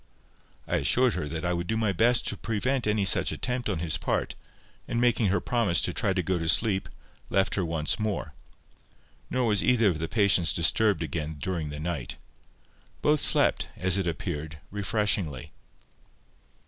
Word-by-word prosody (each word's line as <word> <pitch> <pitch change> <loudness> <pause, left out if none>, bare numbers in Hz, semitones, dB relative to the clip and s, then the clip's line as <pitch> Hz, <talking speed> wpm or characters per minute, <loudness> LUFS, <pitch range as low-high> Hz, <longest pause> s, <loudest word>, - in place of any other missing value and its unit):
I - - 0
assured 125 - +2
her - - -3 0.2
I 90 - 0
would 85 0 -3
do 110 - -1
my 110 -2 +1
best 115 +6 +3
to - - -3
prevent 120 +3 -2
any 105 -1 +1
such - - +5
attempt 125 -2 -3
on 95 - -1
his 80 -2 -1
part, - - -2 0.5
and 115 - -2
making 120 -3 +2
her 100 +2 +1
promise 115 -9 +1
to - - 0
try 100 - 0
to 90 -1 -1
go 90 +1 -1
to 80 0 -1
sleep, 95 +3 +1 0.4
left 95 0 +1
her 95 - 0
once 80 0 -1
more. 105 -2 -3 1.0
Nor 130 -1 0
was 105 -3 +1
either 120 -4 +3
of 80 -4 -3
the 80 - -3
patients 95 -4 +2
disturbed 100 +3 +2
again 80 0 -4
during 85 -2 -3
the 75 0 -7
night. 75 -6 -4 0.9
Both 150 0 +3
slept, - - +4
as 95 +1 +1
it 95 - -2
appeared, 80 -1 -4
refreshingly. 100 - -1
95 Hz, 170 wpm, -27 LUFS, 80-110 Hz, 1.0 s, such